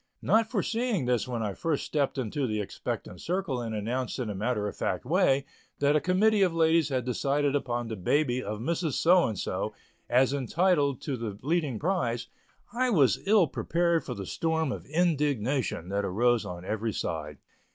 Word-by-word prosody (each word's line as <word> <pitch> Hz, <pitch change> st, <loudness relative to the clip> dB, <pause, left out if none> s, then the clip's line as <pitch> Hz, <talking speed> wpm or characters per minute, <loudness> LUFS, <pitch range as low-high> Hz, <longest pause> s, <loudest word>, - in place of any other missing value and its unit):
Not 225 Hz, 0 st, +3 dB
foreseeing 225 Hz, -, 0 dB
this 125 Hz, 0 st, +1 dB
when 120 Hz, -3 st, -2 dB
I 105 Hz, -2 st, -2 dB
first 155 Hz, +6 st, -1 dB
stepped 145 Hz, -3 st, -1 dB
into 130 Hz, +2 st, -1 dB
the 110 Hz, -1 st, -1 dB
expectant 95 Hz, -2 st, -5 dB
circle 175 Hz, -8 st, -2 dB
and 115 Hz, -2 st, -4 dB
announced 120 Hz, +5 st, -2 dB
in 120 Hz, -5 st, -2 dB
a -, -, -3 dB
matter 105 Hz, +1 st, -1 dB
of -, -, -5 dB
fact 90 Hz, -, -2 dB
way 140 Hz, -3 st, +3 dB, 0.3 s
that 145 Hz, +1 st, +2 dB
a 150 Hz, -, +3 dB
committee 205 Hz, +3 st, +3 dB
of 180 Hz, -3 st, +3 dB
ladies 160 Hz, -1 st, +3 dB
had 130 Hz, -3 st, -1 dB
decided 140 Hz, +3 st, 0 dB
upon 120 Hz, -4 st, -1 dB
the 110 Hz, -, -4 dB
baby 125 Hz, +6 st, +1 dB
of 105 Hz, -2 st, -4 dB
Mrs. 160 Hz, +5 st, -1 dB
So 175 Hz, +5 st, +4 dB
and 110 Hz, -, -4 dB
So -, -, -3 dB, 0.3 s
as 130 Hz, +2 st, +4 dB
entitled 145 Hz, +1 st, +1 dB
to 140 Hz, -, -3 dB
the 110 Hz, -4 st, -5 dB
leading 150 Hz, -5 st, 0 dB
prize, 140 Hz, -, -1 dB, 0.4 s
I 255 Hz, +1 st, +1 dB
was 140 Hz, -, +4 dB
ill 205 Hz, -3 st, +6 dB
prepared 170 Hz, +2 st, 0 dB
for 125 Hz, -, -5 dB
the 100 Hz, -2 st, -6 dB
storm 160 Hz, -, -1 dB
of -, -, -6 dB
indignation 145 Hz, -, 0 dB
that 100 Hz, +1 st, -1 dB
arose 115 Hz, +3 st, +2 dB
on 90 Hz, -1 st, -7 dB
every 110 Hz, +2 st, -2 dB
side. 75 Hz, -5 st, -4 dB
135 Hz, 185 wpm, -28 LUFS, 115-165 Hz, 0.4 s, ill